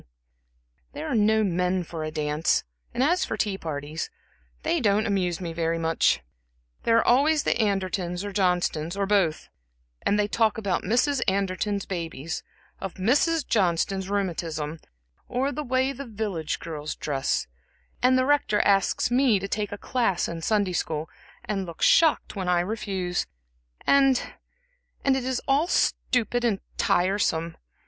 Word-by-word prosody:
"There -, -, -5 dB
are -, -, -1 dB
no 220 Hz, 0 st, +3 dB
men 180 Hz, -1 st, 0 dB
for 165 Hz, -1 st, -6 dB
a 155 Hz, -, -3 dB
dance, 150 Hz, 0 st, 0 dB, 0.3 s
and 255 Hz, -, 0 dB
as 350 Hz, +6 st, +3 dB
for -, -, -2 dB
the -, -, +3 dB
tea 200 Hz, -2 st, -3 dB
parties 155 Hz, 0 st, -4 dB, 0.5 s
they 330 Hz, +2 st, +1 dB
don't 210 Hz, -1 st, +2 dB
amuse 185 Hz, -5 st, 0 dB
me 170 Hz, -3 st, -5 dB
very 165 Hz, 0 st, 0 dB
much. 165 Hz, 0 st, +2 dB, 0.6 s
There 230 Hz, -, +4 dB
are -, -, +3 dB
always 290 Hz, +5 st, +4 dB
the -, -, +2 dB
Andertons, 185 Hz, -3 st, -1 dB
or 205 Hz, -, -4 dB
Johnstons, 180 Hz, -3 st, 0 dB
or 200 Hz, -, +1 dB
both; 190 Hz, -6 st, +1 dB, 0.5 s
and 205 Hz, -, +1 dB
they 210 Hz, 0 st, +2 dB
talk 220 Hz, 0 st, +1 dB
about 200 Hz, -5 st, -1 dB
Mrs. 250 Hz, +7 st, +1 dB
Anderton's 195 Hz, +1 st, 0 dB
babies, 165 Hz, -4 st, -4 dB, 0.4 s
of 195 Hz, -2 st, -5 dB
Mrs. 295 Hz, -, +2 dB
Johnston's 190 Hz, 0 st, +1 dB
rheumatism, 165 Hz, -6 st, -2 dB, 0.5 s
or 260 Hz, +3 st, 0 dB
the 300 Hz, -, -4 dB
way 260 Hz, 0 st, +1 dB
the 275 Hz, 0 st, -8 dB
village 200 Hz, -8 st, -3 dB
girls 155 Hz, -2 st, -5 dB
dress; 135 Hz, -, -1 dB, 0.6 s
and 255 Hz, +1 st, +4 dB
the 255 Hz, -, +2 dB
Rector 280 Hz, -7 st, +2 dB
asks 195 Hz, +4 st, +2 dB
me 250 Hz, -3 st, +4 dB
to 195 Hz, +1 st, -4 dB
take 205 Hz, 0 st, -2 dB
a 205 Hz, -, -5 dB
class 215 Hz, -6 st, 0 dB
in 165 Hz, -1 st, -5 dB
Sunday 205 Hz, 0 st, +1 dB
school, 160 Hz, -2 st, -2 dB, 0.3 s
and 195 Hz, -3 st, -2 dB
looks 170 Hz, -, -1 dB
shocked 320 Hz, -7 st, +4 dB
when 190 Hz, -2 st, -2 dB
I 175 Hz, -1 st, +3 dB
refuse; 190 Hz, -3 st, -2 dB, 0.6 s
and 270 Hz, -2 st, +5 dB, 0.9 s
and 270 Hz, -1 st, +4 dB
it 265 Hz, -, -1 dB
is 260 Hz, -1 st, -1 dB
all 285 Hz, +5 st, +3 dB
stupid 245 Hz, -7 st, +1 dB
and 220 Hz, -5 st, +1 dB, 0.2 s
tiresome. 175 Hz, -3 st, +1 dB
200 Hz, 155 wpm, -26 LUFS, 170-240 Hz, 0.9 s, and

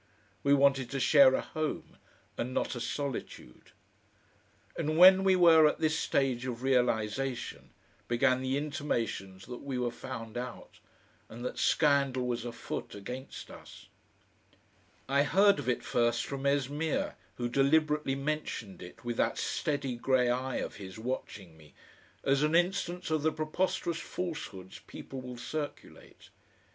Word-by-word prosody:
We 140 Hz, 0 st, +4 dB
wanted 135 Hz, -2 st, +3 dB
to 135 Hz, -, -3 dB
share 135 Hz, -1 st, +6 dB
a -, -, 0 dB
home, 155 Hz, -1 st, -4 dB, 0.4 s
and 125 Hz, +2 st, -4 dB
not -, -, 0 dB
a 120 Hz, -, -5 dB
solitude. 130 Hz, -, -5 dB, 1.1 s
And 155 Hz, +1 st, -1 dB
when 185 Hz, +2 st, +9 dB
we 190 Hz, -1 st, +4 dB
were 165 Hz, -3 st, +7 dB
at 150 Hz, -, 0 dB
this 160 Hz, 0 st, +1 dB
stage 130 Hz, -3 st, 0 dB
of 120 Hz, 0 st, -5 dB
realisation, 125 Hz, -1 st, 0 dB, 0.4 s
began 130 Hz, +2 st, +2 dB
the 130 Hz, +1 st, 0 dB
intimations 115 Hz, -10 st, -3 dB
that 125 Hz, -1 st, -8 dB
we 135 Hz, -2 st, -4 dB
were 125 Hz, -1 st, -1 dB
found 115 Hz, -2 st, -7 dB
out, 125 Hz, -1 st, -8 dB, 0.5 s
and 120 Hz, +2 st, -8 dB
that -, -, -4 dB
scandal 140 Hz, -4 st, +2 dB
was 120 Hz, -1 st, -2 dB
afoot 120 Hz, -3 st, -6 dB
against 125 Hz, +7 st, -8 dB
us.... -, -, -13 dB, 1.2 s
I 140 Hz, +1 st, +3 dB
heard 195 Hz, +7 st, +4 dB
of -, -, -3 dB
it 120 Hz, -, 0 dB
first 120 Hz, 0 st, +1 dB
from 140 Hz, 0 st, -3 dB
Esmeer, 145 Hz, +3 st, 0 dB, 0.2 s
who 120 Hz, -, -2 dB
deliberately 150 Hz, +2 st, +2 dB
mentioned 140 Hz, -8 st, -4 dB
it, 95 Hz, +7 st, -12 dB
with 120 Hz, -1 st, -3 dB
that -, -, +1 dB
steady 140 Hz, -4 st, -2 dB
grey 125 Hz, 0 st, +2 dB
eye 130 Hz, +1 st, -2 dB
of -, -, -4 dB
his 95 Hz, -1 st, -9 dB
watching 110 Hz, -7 st, -5 dB
me, 75 Hz, -2 st, -19 dB, 0.5 s
as 135 Hz, 0 st, +2 dB
an 150 Hz, +2 st, +2 dB
instance 180 Hz, -1 st, 0 dB
of 155 Hz, -1 st, +1 dB
the 160 Hz, +1 st, +2 dB
preposterous 165 Hz, +2 st, -1 dB
falsehoods 155 Hz, -, -6 dB
people 135 Hz, -1 st, -8 dB
will 125 Hz, -1 st, -8 dB
circulate. 145 Hz, +4 st, -7 dB
135 Hz, 145 wpm, -30 LUFS, 120-150 Hz, 1.2 s, when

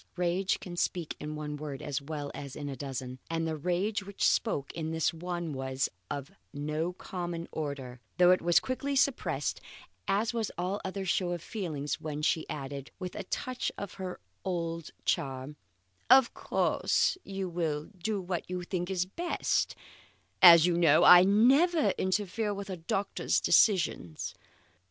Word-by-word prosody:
Rage 180 Hz, +2 st, 0 dB
can 175 Hz, -2 st, -8 dB
speak 175 Hz, -2 st, -1 dB
in 150 Hz, 0 st, -5 dB
one 150 Hz, -1 st, -5 dB
word 145 Hz, -2 st, -6 dB
as 140 Hz, -1 st, -3 dB
well 145 Hz, 0 st, -5 dB
as 140 Hz, -2 st, -7 dB
in 145 Hz, -, -5 dB
a 135 Hz, -, -4 dB
dozen, 130 Hz, -1 st, -5 dB
and 165 Hz, 0 st, -1 dB
the 160 Hz, -, -2 dB
rage 180 Hz, +7 st, -1 dB
which 195 Hz, 0 st, 0 dB
spoke 145 Hz, -, 0 dB
in 160 Hz, -1 st, -3 dB
this 160 Hz, +1 st, 0 dB
one 175 Hz, -1 st, -4 dB
was 130 Hz, 0 st, -1 dB, 0.2 s
of 145 Hz, +3 st, -5 dB, 0.2 s
no 150 Hz, +4 st, -2 dB
common 175 Hz, -2 st, -5 dB
order, 140 Hz, -5 st, -5 dB, 0.2 s
though 180 Hz, 0 st, +7 dB
it 185 Hz, -, +4 dB
was 175 Hz, 0 st, +4 dB
quickly 275 Hz, +2 st, -3 dB
suppressed, 235 Hz, -, 0 dB, 0.5 s
as 215 Hz, +4 st, +1 dB
was 225 Hz, -3 st, -1 dB
all 185 Hz, +4 st, -2 dB
other 190 Hz, +1 st, -4 dB
show 180 Hz, -1 st, +1 dB
of 175 Hz, -, -4 dB
feeling 160 Hz, -9 st, -4 dB
when 150 Hz, -1 st, -5 dB
she 160 Hz, 0 st, +1 dB
added, 140 Hz, -1 st, -5 dB
with 180 Hz, -1 st, -5 dB
a -, -, -6 dB
touch 255 Hz, +6 st, -3 dB
of 200 Hz, -2 st, -6 dB
her 185 Hz, -1 st, -5 dB, 0.2 s
old 165 Hz, -3 st, -3 dB, 0.2 s
charm: 135 Hz, +1 st, -1 dB, 0.5 s
"Of 260 Hz, -2 st, +7 dB
course -, -, +1 dB
you 195 Hz, -1 st, -4 dB
will 160 Hz, -4 st, -2 dB
do 205 Hz, +3 st, -2 dB
what 180 Hz, -2 st, -4 dB
you 180 Hz, -1 st, -3 dB
think 180 Hz, 0 st, -3 dB, 0.3 s
best, 350 Hz, 0 st, 0 dB, 0.7 s
as 170 Hz, -2 st, +10 dB
you 175 Hz, -1 st, +2 dB
know 155 Hz, -3 st, +5 dB
I 180 Hz, 0 st, +10 dB
never 270 Hz, -, +4 dB
interfere 205 Hz, +2 st, -1 dB
with 200 Hz, 0 st, -6 dB
a 185 Hz, -, -4 dB
doctor's 195 Hz, +4 st, 0 dB
decisions. 170 Hz, -, +2 dB
175 Hz, 160 wpm, -30 LUFS, 150-195 Hz, 0.7 s, as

